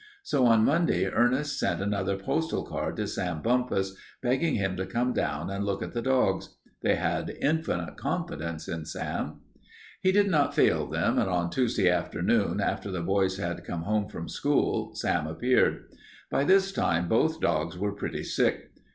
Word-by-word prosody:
So 130 - +2
on 115 -1 +5
Monday 150 - +2
Ernest 130 +8 +1
sent - - 0
another 100 -1 -1
postal 80 -4 -1
card - - -3
to - - -2
Sam 90 -4 -3
Bumpus, 115 -6 +1 0.3
begging 130 +6 +1
him 95 -3 0
to 95 +1 -3
come 120 +5 0
down 75 +6 -2
and 100 +1 -2
look 100 -1 -2
at - - -7
the 120 - -1
dogs. 130 -7 +1 0.3
They - - +3
had - - -1
infinite 150 - -1
confidence 80 +1 -3
in 80 -2 -4
Sam. - - -4 0.6
He 185 - +4
did 205 +1 +4
not 150 -7 +2
fail - - +3
them, - - +1
and - - +1
on 85 -1 0
Tuesday 115 -4 +1
afternoon 90 0 +1
after - - -1
the 90 -3 -3
boys 95 0 +1
had 85 -3 -3
come 85 -1 -4
home 105 +1 0
from 85 - -6
school 110 - 0
Sam 85 -7 0
appeared. 120 +11 +2 0.5
By 140 - +2
this 195 +3 +4
time 85 - +1
both 160 - +2
dogs 80 - 0
were 100 +2 -1
pretty 100 - -4
sick. - - 0
100 Hz, 170 wpm, -28 LUFS, 90-125 Hz, 0.6 s, on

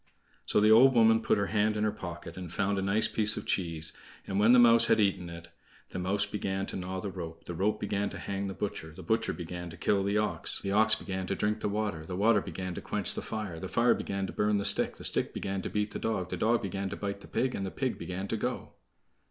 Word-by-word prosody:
So - - +2
the 105 +1 +5
old 130 +4 +7
woman 115 -1 +5
put 110 - +1
her 100 - 0
hand 105 0 +2
in 105 - 0
her 105 - +1
pocket 85 -4 -8
and 90 -3 -8
found 100 +1 0
a - - -1
nice 100 +3 +2
piece 110 -1 +1
of - - -5
cheese; 80 -4 0 0.3
and 95 - -2
when 110 +3 +5
the 125 - +7
mouse 115 -1 +7
had - - +3
eaten 95 -4 +1
it: 85 0 -10 0.4
The - - -4
mouse 100 +3 +1
began 95 -2 -3
to - - -5
gnaw 95 0 -4
the 100 - -4
rope, 85 -3 -8
The 85 - -6
rope 105 +5 0
began 100 -1 -1
to - - -8
hang 100 0 -4
the 95 - -6
butcher, 80 -6 -5
The 95 - -10
butcher 110 +5 0
began 85 0 -6
to 80 - -11
kill 100 -1 +1
the 100 +1 0
ox, 105 0 +2
The 100 - -4
ox 110 +2 +5
began 95 -1 -5
to - - -1
drink 105 +1 -1
the 105 - -2
water, 105 -6 -2
The 90 - -5
water 105 +1 +3
began 95 -1 -5
to - - -6
quench - - 0
the - - -4
fire, 105 -7 -5
The 95 - -5
fire 120 +1 +3
began 100 0 -3
to - - -7
burn 105 0 +1
the 100 - -2
stick, - - +4
The - - -11
stick - - +2
began 95 0 -3
to - - -5
beat 105 0 -2
the - - -5
dog, 95 -5 -2
The - - -1
dog 115 +1 +1
began 95 0 -3
to 100 - -5
bite 100 -1 -4
the - - -12
pig, 130 0 -1
And 95 - -3
the 95 - -3
pig 130 +5 -3
began 95 +2 -5
to 115 - -1
go. 125 +3 -4
100 Hz, 265 wpm, -29 LUFS, 95-110 Hz, 0.4 s, old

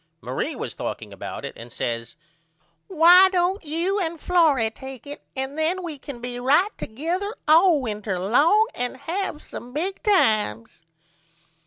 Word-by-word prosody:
Marie - - -3
was - - -5
talking - - -6
about - - -7
it - - -6
and 115 +1 -11
says 115 -1 -4 0.7
Why 360 +2 +7
don't 370 +2 0
you 335 +6 -1
and 335 -3 -3
Florrie 300 -12 +3
take 265 +2 -10
it 285 +1 -8
and 265 +1 -3
then 355 +4 0
we 315 -5 -6
can 270 -3 -9
be 245 0 -5
right 295 +11 +2
together 350 - -4
all 325 +1 +6
winter 210 -4 -3
ong 285 - +4
and 245 +1 -3
have 340 0 -4
some 245 +1 -10
big 370 +7 -3
times. 215 - +1
305 Hz, 150 wpm, -23 LUFS, 245-360 Hz, 0.7 s, Why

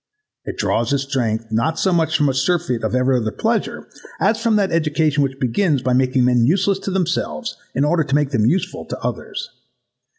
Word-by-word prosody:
It - - -6
draws 115 +2 0
its 140 -1 +1
strength, 115 -5 -2
not 115 +9 0
so 190 - +1
much 160 -2 +2
from 145 - +2
a 135 - +1
surfeit 135 -2 0
of - - -1
every 130 0 +2
other 110 -3 -1
pleasure, - - -2 0.3
as 220 +3 +1
from 230 -2 +2
that 200 -2 +1
education 155 -2 +1
which 135 -1 -1
begins 140 - +1
by 130 -1 +1
making 130 0 +2
men 125 -1 +3
useless 195 +8 +2
to 195 - -5
themselves 170 - -2 0.2
in 140 +3 +2
order 165 +2 +2
to 140 0 0
make 145 -2 +1
them 110 -5 +2
useful 180 +8 -1
to - - -6
others. - - -5
140 Hz, 200 wpm, -20 LUFS, 125-170 Hz, 0.3 s, men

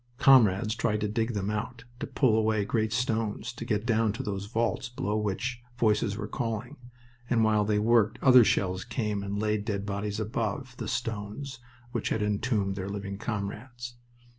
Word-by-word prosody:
Comrades 110 -6 +5
tried 115 -3 0
to 105 - +1
dig 115 +2 -1
them 100 0 -1
out, 115 +3 -4 0.2
to - - -3
pull 125 -6 +3
away 110 -2 +2
great 110 0 0
stones, 115 -1 -1
to 120 - -7
get 110 -2 -1
down 115 -2 +2
to 130 +5 -4
those 100 -2 -3
vaults 115 +3 -1
below 120 -4 -2
from 110 - 0
which 115 +5 -2 0.2
voices 105 -3 +2
were 105 - -4
calling; 115 +3 -3 0.5
and 115 -2 +3
while 110 -1 +3
they 105 0 +1
worked 110 0 +3
other 130 -2 +8
shells 95 -3 +1
came 110 -4 -2
and 100 +1 -3
laid 105 0 0
dead 100 -1 -2
bodies 100 +1 -3
above 115 +4 -3
the - - -4
stones 115 +5 -4 0.3
which - - -2
had 110 - 0
entombed 105 -1 0
their 95 0 -4
living 100 -1 -5
comrades. 120 +3 -5
110 Hz, 180 wpm, -28 LUFS, 105-120 Hz, 0.5 s, other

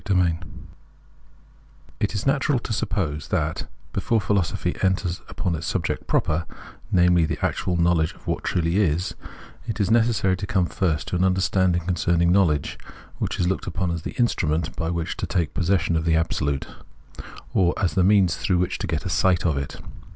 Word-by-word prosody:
INTRODUCTION 90 -3 +1 1.5
IT 105 0 -1
is 100 - -2
natural 135 0 +2
to 120 -1 -4
suppose 75 -8 -2
that, 80 +1 -1 0.3
before 115 - +1
philosopliy 100 -3 -1
enters 95 -2 0
upon 90 - -2
its 80 0 -4
subject 85 -5 -2
proper 80 +1 0 0.2
— - - -21
namely, 90 -1 +4
the 80 - -1
actual 90 -1 -1
knowledge 85 -2 +2
of - - -21
what - - -2
truly 85 +1 0
is 90 -3 +1 0.3
— - - -20
it 110 -2 -3
is 100 0 +1
necessary 110 -5 +3
to 95 +2 -5
come 95 -2 +2
first 85 -3 -1
to 90 - -2
an 90 - +2
understanding 95 -2 +2
concerning 85 -1 +2
knowledge, 85 -7 +2 0.4
which - - -2
is 90 - +2
looked 95 - -2
upon 90 0 -1
as 85 -1 -3
the - - -6
instrument 80 - 0
by 80 - -2
which 85 -1 -2
to - - -3
take 80 -4 -1
possession 90 0 +1
of 80 - +1
the 80 0 +2
Absolute, 70 -4 0 0.9
or 90 -2 +3
as 95 - 0
the 95 - +3
means 95 -3 +4
through 90 - +1
which 90 +1 -1
to 100 - -3
get 80 -4 -2
a - - -1
sight 90 -2 +2
of 80 -4 +2
it. 70 -1 -4
90 Hz, 185 wpm, -24 LUFS, 80-95 Hz, 1.5 s, namely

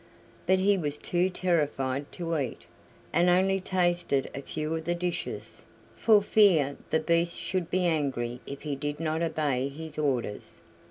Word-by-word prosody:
But 190 +1 +5
he 195 +1 +3
was 150 -3 -2
too 175 +4 0
terrified 145 -7 -1
to 170 -1 -3
eat, 135 -6 -3 0.5
and 175 +3 +4
only 190 +2 +3
tasted 175 -7 0
a 135 - -5
few 155 +3 -3
of 160 0 -5
the 175 +1 0
dishes, 175 0 -4 0.3
for 215 -3 +4
fear 175 -10 +4
the 160 - +2
Beast 170 +1 +1
should 185 -3 -2
be 185 0 +1
angry 135 -7 -1
if 140 0 -7
he 150 -2 -2
did 145 +2 -4
not 160 0 -1
obey 145 -5 0
his 160 +2 -8
orders. 130 -8 -2
160 Hz, 160 wpm, -28 LUFS, 145-180 Hz, 0.5 s, But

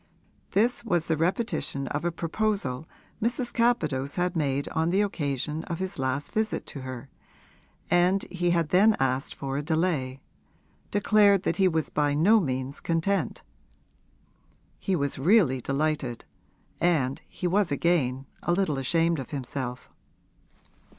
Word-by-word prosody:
This 235 +5 +3
was 175 -7 0
the 160 - +2
repetition 165 - -1
of 145 +2 -3
a 175 - 0
proposal 165 -5 -2 0.3
Mrs. 240 +2 0
Capadose 155 - +1
had 180 0 0
made 140 -3 0
on 160 +1 0
the 195 +4 +3
occasion 150 -4 -2
of 170 - -4
his 190 -3 -5
last 130 +2 -1
visit 220 0 -1
to 140 - -6
her, 130 0 -7 0.8
and 180 +3 +3
he 175 -1 0
had 170 -3 +1
then 210 +6 +5
asked 135 0 0
for 135 0 -4
a - - -1
delay 150 -4 -1 0.7
declared 205 -1 +4
that - - 0
he 190 -1 +4
was 160 -3 -1
by 145 -1 +1
no 205 +9 +5
means 130 -4 -3
content. 170 +4 -1 1.4
He 195 - 0
was 140 -4 -1
really 155 - +4
delighted, 140 -3 -2 0.5
and 145 -7 +1
he - - -6
was 185 -1 +2
again 140 -4 +1 0.2
a 175 - 0
little 175 -7 0
ashamed 165 +4 +2
of 130 - -6
himself. 130 -2 -5
160 Hz, 140 wpm, -27 LUFS, 140-190 Hz, 1.4 s, then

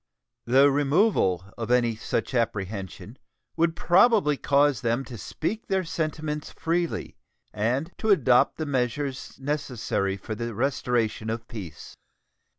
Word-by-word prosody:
The 135 +4 +5
removal 140 - +2
of 115 -1 -4
any 120 -2 +3
such 110 +3 -3
apprehension 100 -6 -3 0.4
would 165 0 +1
probably 185 -3 +4
cause 140 -3 +2
them 120 +3 0
to 125 - -9
speak 185 - -4
their 190 -1 +1
sentiments 155 -2 -3
freely 170 +1 -2 0.4
and 125 +10 -1
to 220 - -1
adopt 130 - +4
the 155 - -2
measures 135 0 -2
necessary 125 -9 -2
for 105 +3 -6
the 115 0 -4
restoration 120 -3 0
of 115 +1 -4
peace. 100 -9 -9
130 Hz, 125 wpm, -26 LUFS, 115-155 Hz, 0.4 s, The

